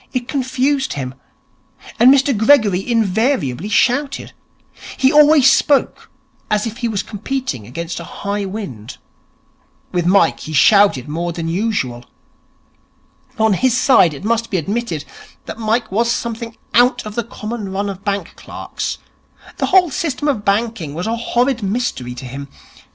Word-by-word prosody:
It 245 -2 -2
confused 270 0 0
him. 130 -2 -5 0.9
And 245 +3 +8
Mr 275 -1 +3
Gregory 215 -3 +3
invariably 215 - 0
shouted. 275 +6 0 0.6
He 265 0 +3
always 295 -2 +6
spoke 285 -2 +1 0.4
as 210 +1 +1
if 230 0 -5
he 240 - -2
were 220 -3 -3
competing 205 - -4
against 170 +7 -5
a - - -7
high 200 +4 -4
wind. 190 - -7 0.9
With 175 -1 0
Mike 180 -3 +3
he 155 - -7
shouted 200 - +4
more 170 +3 -3
than 165 -1 -5
usual. 165 - -2 1.3
On 220 -1 +3
his 255 +5 +2
side, 190 - +4
it 140 - -10
must 230 +1 0
be 190 - 0
admitted 195 -2 -3 0.4
that - - -8
Mike 220 0 0
was 230 +4 +1
something 230 -1 -4 0.2
out 245 0 +3
of 210 - -6
the 235 - -2
common 215 -2 -6
run 200 +1 -2
of 195 -1 -6
bank 200 -3 -3
clerks. - - -6 0.6
The - - 0
whole 365 -4 +4
system 290 -1 -2
of 255 -8 0
banking 200 -7 -1
was 175 - -3
a 225 +1 -1
horrid 240 +2 0
mystery 195 - -2
to 130 - -8
him. 140 +3 -7
220 Hz, 150 wpm, -18 LUFS, 180-245 Hz, 1.3 s, And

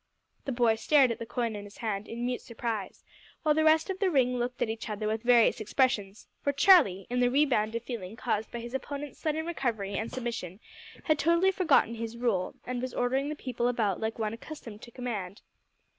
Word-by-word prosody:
The 275 - -2
boy 235 -3 +3
stared 270 +1 +4
at 230 - -4
the 230 - -6
coin 235 -3 -2
in 205 - -6
his 205 0 -13
hand 210 -2 -3
in 235 +1 -4
mute 250 0 -2
surprise, 225 -4 -5 0.4
while 305 -1 +4
the 315 +1 +2
rest 315 0 +4
of 380 - -6
the 390 -2 +2
ring 250 -5 +2
looked 245 +1 -3
at - - -1
each 220 0 -5
other 210 0 -3
with 220 +1 -1
various 240 -1 +4
expressions, 210 -3 0
for 285 - +1
Charlie, 280 - +5
in 250 - +1
the 245 0 +4
rebound 245 -6 +2
of 230 - -3
feeling 225 -5 -6
caused 220 -2 -2
by - - -6
his 235 +1 -8
opponent's 285 +2 -5
sudden 315 0 -1
recovery 230 -12 -2
and 220 +3 -3
submission, 230 -7 -5 0.4
had 310 -2 +2
totally 340 +4 +4
forgotten 335 - +3
his 230 0 -5
role 220 -7 0
and 250 -1 -3
was 255 0 -4
ordering 265 +3 0
the 305 - -3
people 245 -4 -2
about 220 -6 0
like 220 0 -3
one 215 -1 -2
accustomed 230 -4 -9
to - - -11
command. 215 -6 -5
240 Hz, 210 wpm, -29 LUFS, 220-270 Hz, 0.4 s, Charlie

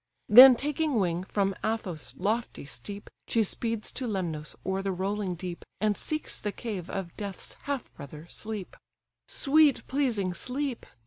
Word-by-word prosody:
Then 250 +4 +11
taking 295 +2 -1
wing 180 -4 +1
from 195 0 0
Athos' 210 -8 -3
lofty 215 -1 -1
steep, 140 +11 -9 0.2
She 230 - +3
speeds 225 +2 -1
to 255 - -3
Lemnos 170 -8 -3
o'er 190 0 0
the 195 0 -1
rolling 190 0 -2
deep, 175 0 -6 0.2
And 210 +1 +2
seeks 310 +7 -3
the 205 - -2
cave 200 -5 -5
of 190 -4 -5
Death's 200 -3 -5
half 280 -3 -3
brother, 150 +3 -10
Sleep. 215 0 -5 0.5
"Sweet 295 0 +3
pleasing 235 -9 0
Sleep! 255 +6 -3
205 Hz, 145 wpm, -28 LUFS, 185-245 Hz, 0.5 s, Then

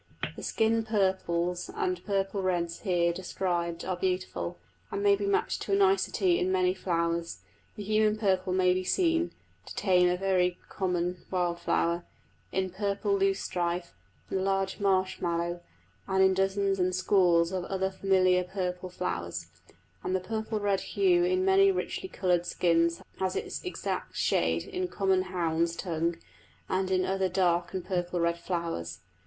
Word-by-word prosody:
The - - -8
skin 225 +1 +1
purples 190 - 0
and 375 -4 -1
purple 195 -1 -1
reds 175 -3 -1
here 175 -4 +1
described 175 -2 -2
are 185 - -1
beautiful, 180 - -2 0.3
and 200 - -3
may 200 -1 +6
be 200 0 -3
matched 200 - 0
to 200 - -2
a - - +6
nicety 190 -2 +3
in 185 +1 +1
many 185 -1 +2
flowers; 170 -2 -2 0.3
the 210 - -6
human 215 +1 +2
purple 190 -3 +1
may 185 0 +3
be 185 0 -1
seen 335 - +2 0.4
(to - - -6
name 180 -2 +5
a 180 - +1
very 180 -2 +1
common 180 -1 -2
wild 175 -2 0
flower) 170 0 0 0.5
in 190 -1 -1
purple 200 +1 0
loosestrife 180 -3 -1 0.4
and 190 - 0
the - - -1
large 195 0 0
marsh 190 -2 +1
mallow, 170 0 -1 0.5
and 190 0 +3
in 190 0 +5
dozens 195 +1 +1
and 180 0 +1
scores 180 -3 +3
of 185 -2 -2
other 190 0 -1
familiar 185 -1 +3
purple 180 -1 -4
flowers; 85 - -4 0.5
and 185 - -1
the - - +2
purple 220 +3 -3
red 200 -2 +1
hue 360 -3 +2
in 370 +1 +2
many 390 +1 +5
richly 380 0 -3
coloured 180 - 0
skins 170 -1 +2 0.2
has 190 -1 -1
its - - -4
exact 365 - -4
shade - - +1
in 365 0 -3
common 190 - +1
hounds' 170 -2 0
tongue, 170 -1 -1 0.5
and 190 0 0
in 185 -1 +2
other 190 0 0
dark 175 -1 +1
and 185 - -3
purple 175 -2 -1
red 170 0 +1
flowers. 165 - -3
185 Hz, 160 wpm, -29 LUFS, 175-195 Hz, 0.5 s, may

